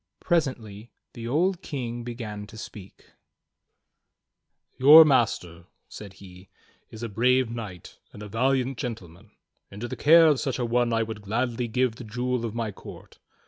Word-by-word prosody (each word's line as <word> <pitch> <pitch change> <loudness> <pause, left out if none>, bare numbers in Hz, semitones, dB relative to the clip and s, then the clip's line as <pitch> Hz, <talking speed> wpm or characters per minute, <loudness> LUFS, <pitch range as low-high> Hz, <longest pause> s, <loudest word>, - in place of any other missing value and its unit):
Presently 120 - -2 0.2
the 115 -1 -7
old 175 +8 0
King 120 -7 -5
began 110 -4 -7
to 110 - -13
speak: 105 -3 -12 1.7
"\our 155 +3 +10
master," 90 - 0 0.2
said 100 -3 -10
he, 95 -1 -15 0.4
"is 110 +1 -10
a - - -2
brave 125 +3 +1
knight 105 -7 -9
and 105 - -11
a - - -8
valiant 130 +3 0
gentle 110 -8 -5
man. 90 +7 -19 0.4
Into 105 +5 -7
the - - -6
care 165 +2 +6
of 150 -4 +3
such 135 -4 -2
a 125 - -2
one 120 +1 +1
would 115 -2 -2
I - - -16
gladly 120 +3 -2
give 120 0 -1
the - - -9
Jewel 120 +2 -3
of 115 -1 -5
my 115 -2 -3
court. - - -13
115 Hz, 160 wpm, -25 LUFS, 105-130 Hz, 1.7 s, our